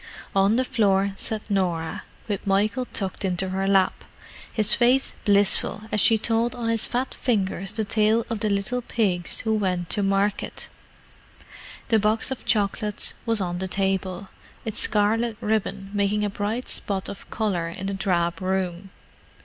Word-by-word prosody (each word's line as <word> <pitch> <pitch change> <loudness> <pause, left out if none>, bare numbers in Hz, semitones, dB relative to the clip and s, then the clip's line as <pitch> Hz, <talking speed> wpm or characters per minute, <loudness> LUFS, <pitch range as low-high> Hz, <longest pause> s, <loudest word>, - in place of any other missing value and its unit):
On 195 +3 +4
the 255 +2 +2
floor 200 -6 +2
sat 215 +1 -3
Norah, 175 -5 -1 0.3
with 205 -2 -3
Michael 205 +5 +1
tucked 195 -4 -2
into 185 0 -1
her 190 +1 -1
lap, 195 -1 +2 0.5
his 215 -2 +2
face 255 +3 +3
blissful 205 0 +3
as 210 - +2
she 225 - +5
told 230 +2 +1
on 235 -2 -2
his 230 -1 +3
fat 255 +2 -2
fingers 195 -5 -1
the 220 - -2
tale 215 +2 +2
of 225 -3 -3
the 215 0 0
little 200 +5 -1
pigs 190 -8 +1
who 220 -1 0
went 185 -5 -1
to 205 - +3
market. 195 +1 -1 1.2
The 225 -2 +4
box 215 +5 +1
of 265 - -5
chocolates 210 -1 0
was 225 -1 +2
on 175 -1 -2
the 190 - -2
table, 190 0 -2 0.4
its 220 - -3
scarlet 220 +2 +2
ribbon 210 -3 -2
making 205 +1 +1
a 205 - -2
bright 210 +5 -3
spot 195 -2 -4
of 200 - -9
colour 190 -7 -1
in 185 +3 -7
the 195 - -2
drab 175 -3 0
room. 185 0 -2
205 Hz, 160 wpm, -24 LUFS, 190-220 Hz, 1.2 s, she